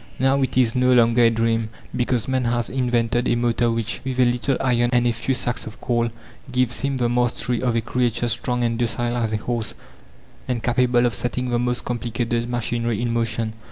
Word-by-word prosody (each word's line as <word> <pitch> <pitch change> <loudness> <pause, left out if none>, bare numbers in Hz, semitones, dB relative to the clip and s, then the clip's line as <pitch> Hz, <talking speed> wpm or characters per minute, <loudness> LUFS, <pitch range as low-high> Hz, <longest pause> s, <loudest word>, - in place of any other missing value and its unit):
Now 135 +2 +2
it 130 - -1
is 120 -3 +4
no 125 0 +3
longer 115 0 +4
a - - +6
dream, 115 0 0 0.3
because 120 -2 0
man 130 -1 0
has 120 0 -1
invented 120 -2 +1
a - - +2
motor 120 0 +1
which, 115 -1 -2
with 130 -1 -3
a 125 - +6
little 125 +2 +1
iron 120 -2 +2
and 120 -1 +3
a 120 - +3
few 115 +4 -1
sacks 120 -2 -3
of 110 - -10
coal, 120 -1 0 0.4
gives 125 -2 +1
him 140 -2 -1
the 120 -2 +1
mastery 120 0 0
of 125 -2 0
a 115 - +2
creature 120 +1 0
strong 120 +2 -1
and 115 0 0
docile 120 0 0
as 115 -2 -1
a 110 - 0
horse, 115 0 -3 0.7
and 120 -3 -2
capable 125 0 +3
of 120 - +1
setting 125 +4 -2
the 120 - +1
most 125 0 -1
complicated 120 -1 -2
machinery 120 -2 -1
in 120 -1 -1
motion. 115 -1 -1
120 Hz, 205 wpm, -22 LUFS, 115-125 Hz, 0.7 s, a